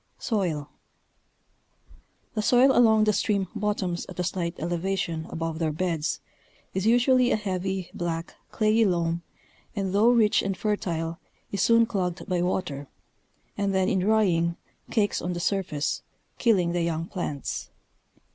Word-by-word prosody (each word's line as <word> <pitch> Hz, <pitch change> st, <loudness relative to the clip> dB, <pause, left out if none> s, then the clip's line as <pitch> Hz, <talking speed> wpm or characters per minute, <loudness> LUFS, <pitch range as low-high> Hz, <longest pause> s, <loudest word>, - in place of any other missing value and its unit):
Soin. 175 Hz, -, -1 dB, 1.7 s
The 215 Hz, -, -1 dB
soil 250 Hz, +5 st, +5 dB
along 220 Hz, -3 st, +5 dB
the 215 Hz, 0 st, +3 dB
stream 200 Hz, -2 st, +1 dB
bottoms 205 Hz, -5 st, -2 dB
at -, -, -9 dB
a -, -, +1 dB
slight 175 Hz, -1 st, -2 dB
elevation 175 Hz, -2 st, -2 dB
above 165 Hz, -1 st, -3 dB
their 160 Hz, -2 st, +1 dB
beds 165 Hz, -1 st, -1 dB, 0.5 s
is 190 Hz, +2 st, 0 dB
usually 245 Hz, +1 st, +4 dB
a -, -, +3 dB
heavy, 190 Hz, -3 st, -3 dB
black, 170 Hz, -1 st, -3 dB, 0.2 s
clayey 215 Hz, +1 st, +3 dB
loam, 170 Hz, -3 st, +1 dB, 0.5 s
and 195 Hz, -2 st, -2 dB
though 210 Hz, +4 st, +5 dB
rich 225 Hz, -4 st, +4 dB
and 195 Hz, -1 st, -2 dB
fertile 170 Hz, -5 st, -2 dB, 0.3 s
is 200 Hz, -, -1 dB
soon 230 Hz, 0 st, +5 dB
clogged 190 Hz, -5 st, -2 dB
by 180 Hz, -3 st, 0 dB
water, 175 Hz, -6 st, -2 dB, 0.7 s
and 200 Hz, -1 st, 0 dB
then 190 Hz, -1 st, +2 dB
in 190 Hz, -, +2 dB
drying, 180 Hz, -5 st, +2 dB, 0.3 s
cakes 210 Hz, -3 st, +1 dB
on 180 Hz, -, -2 dB
the 175 Hz, -, -4 dB
surface, 175 Hz, -6 st, -1 dB, 0.4 s
killing 190 Hz, -8 st, +3 dB
the 175 Hz, 0 st, 0 dB
young 165 Hz, -1 st, -1 dB
plants. 170 Hz, -7 st, -4 dB
185 Hz, 140 wpm, -26 LUFS, 170-210 Hz, 1.7 s, soil